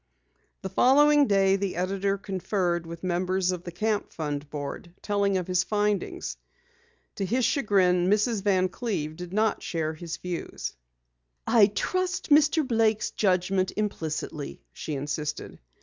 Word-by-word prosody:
The 190 - -3
following 290 +7 +5
day, 195 -1 +3
the 195 -1 -2
editor 195 +2 0
conferred 185 -3 -2
with 170 +1 -8
members 185 +1 0
of 180 -1 -5
the 175 - -5
Camp 210 +4 -1
Fund 145 -2 -4
board, 150 +4 -6
telling 200 -2 +1
of 180 - -2
his 180 -1 +1
findings. 210 -1 -1 0.8
To 200 - -1
his 245 +5 +1
chagrin, 185 - +2
Mrs. 210 +1 +2
Van 190 -2 +2
Cleve 180 -7 -3
did 175 +1 -8
not 215 +1 +1
share 160 -2 -2
his 165 +1 -6
views. 180 -2 -5 0.7
"I 220 -4 +6
trust 370 - -2
Mr. 300 0 +5
Blake's 225 -3 +1
judgment 185 -1 +1
implicitly," 155 -7 -4
she 155 - -5
insisted. 150 +2 -4
190 Hz, 135 wpm, -27 LUFS, 175-210 Hz, 0.8 s, I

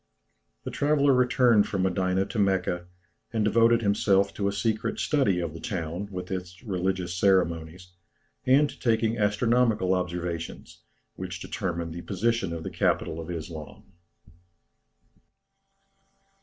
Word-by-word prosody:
The - - -5
traveller 145 -1 +3
returned 125 -4 +4
from 95 -2 -1
Medina 95 0 +1
to 110 +2 -4
Mecca, 90 -3 0 0.4
and 110 -2 0
devoted 115 +2 +4
himself 100 -1 +2
to 100 - -1
a - - +1
secret 110 +2 -1
study 130 -12 +2
of 85 -3 -3
the 85 - -8
town, 90 -3 -4
with 90 0 -6
its 90 +1 -6
religious 95 -3 -2
ceremonies, 90 -2 +1 0.5
and 140 +3 +4
to - - -12
taking 115 -1 +1
astronomical 105 -1 +2
observations, 85 -2 -4 0.4
which 90 -1 -5
determined 85 -3 -4
the 85 - -6
position 100 0 -1
of 85 -1 -5
the - - -5
capital 80 - 0
of 80 +1 -7
Islam. 80 +2 -8
95 Hz, 130 wpm, -27 LUFS, 90-110 Hz, 0.5 s, returned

